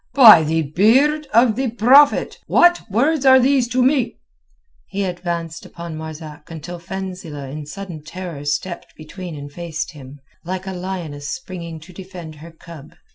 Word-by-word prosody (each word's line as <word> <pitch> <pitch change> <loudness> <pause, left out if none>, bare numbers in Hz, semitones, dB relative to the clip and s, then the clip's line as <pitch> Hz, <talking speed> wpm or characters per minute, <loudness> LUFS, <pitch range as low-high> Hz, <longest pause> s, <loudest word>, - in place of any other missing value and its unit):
"By 225 - +10
the 160 +1 0
beard 260 - +3
of 230 -1 +4
the 260 +1 -1
Prophet! 255 +6 +4
what 350 -6 +3
words 275 +8 +1
are 260 -1 +7
these 260 -1 +2
to 250 +1 +1
me?" 260 -1 +1 0.7
He 200 +1 -3
advanced 170 -2 -4
upon 170 -2 -8
Marzak 155 -1 -9
until 170 +2 -8
Fenzileh 170 -6 -7
in 150 0 -7
sudden 175 -2 -8
terror 165 -2 -7
stepped 145 +5 -4
between 170 +2 -9
and 145 0 -9
faced 170 +1 -5
him, 140 -2 -12 0.2
like 185 +2 -5
a 190 - -5
lioness 175 -6 -6
springing 170 - -7
to 180 +4 -14
defend 180 -3 -10
her 160 +3 -11
cub. 160 -2 -13
175 Hz, 155 wpm, -20 LUFS, 160-220 Hz, 0.7 s, By